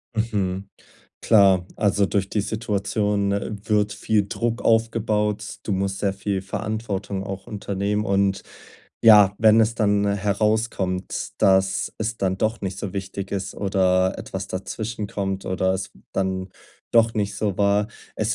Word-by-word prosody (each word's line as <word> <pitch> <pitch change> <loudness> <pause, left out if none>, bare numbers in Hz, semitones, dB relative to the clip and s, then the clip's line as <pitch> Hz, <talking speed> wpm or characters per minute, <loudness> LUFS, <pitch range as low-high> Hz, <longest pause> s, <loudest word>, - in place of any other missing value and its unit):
Mhm. 100 -3 -1 0.5
Klar, 95 -5 +5
also, 100 -1 +2
durch 100 0 -1
die 105 - 0
Situation, 105 -1 -1
äh, 100 +2 -2
wird 105 -1 +1
viel 105 -2 +1
Druck 115 +2 -2
aufgebaut. 105 -2 +1
Du 105 - -3
musst 95 0 -1
sehr 100 -2 0
viel 100 -1 -2
Verantwortung 100 -1 -3
auch 95 -1 -7
unternehmen 100 +1 -2
und 100 0 +1 0.6
ja, 105 -3 +8
wenn 110 0 +6
es 110 +1 +2
dann 105 -2 +2
herauskommt, 100 -1 -1
dass 95 0 +3
es 110 +1 -3
dann 95 -1 0
doch 110 +3 -1
nicht 95 -1 -4
so 95 -3 -4
wichtig 95 0 -5
ist, 100 0 -3
oder 95 -2 +1
etwas - - -5
dazwischen 105 +3 -4
kommt 95 -1 -3
oder 95 0 +1
es 95 0 -4 0.2
dann 95 -1 -2 0.4
doch 115 -1 +4
nicht 105 -1 -1
so 100 -4 -1
war 100 0 +2 0.3
es 110 +1 0
100 Hz, 145 wpm, -23 LUFS, 95-110 Hz, 0.6 s, ja